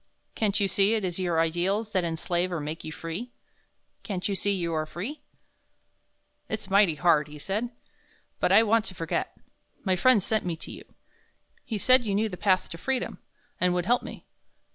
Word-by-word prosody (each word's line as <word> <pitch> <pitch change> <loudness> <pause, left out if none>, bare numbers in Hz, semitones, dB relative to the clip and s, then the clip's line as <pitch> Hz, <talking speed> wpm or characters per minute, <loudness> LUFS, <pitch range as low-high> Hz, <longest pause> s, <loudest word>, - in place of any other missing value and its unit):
Can't 210 -1 0
you 200 - +2
see 200 +3 +3
it 215 -3 -1
is 180 0 -3
your 175 -3 +1
ideals 185 +7 0
that 185 -3 +1
enslave 170 +2 -1
or 170 - -1
make 155 +2 -5
you 155 - -6
free? 170 +9 -6 0.7
Can't 190 -4 -3
you 200 - -1
see 200 +1 +1
you 175 -4 -1
are 155 -1 -1
free?" 220 - -6 1.3
"It's 210 -3 -4
mighty 195 -5 +5
hard," 155 -2 +3
he 150 0 -10
said, 205 +10 -2 0.7
"but - - +2
I 225 - +7
want 225 0 +3
to 185 - -5
forget. 165 -1 -3 0.5
My 190 -2 +2
friend 215 +2 +4
sent 220 +1 +1
me 175 -2 -2
to 160 - -9
you. - - -10 0.8
He 220 - -3
said 255 +4 +5
you 205 -3 -1
knew 215 +2 +1
the 180 - -6
path 185 0 +2
to 165 - -8
freedom, 265 +3 -2 0.4
and 180 -1 +2
would 175 -1 0
help 245 +5 +3
me. - - -9
190 Hz, 190 wpm, -27 LUFS, 170-215 Hz, 1.3 s, I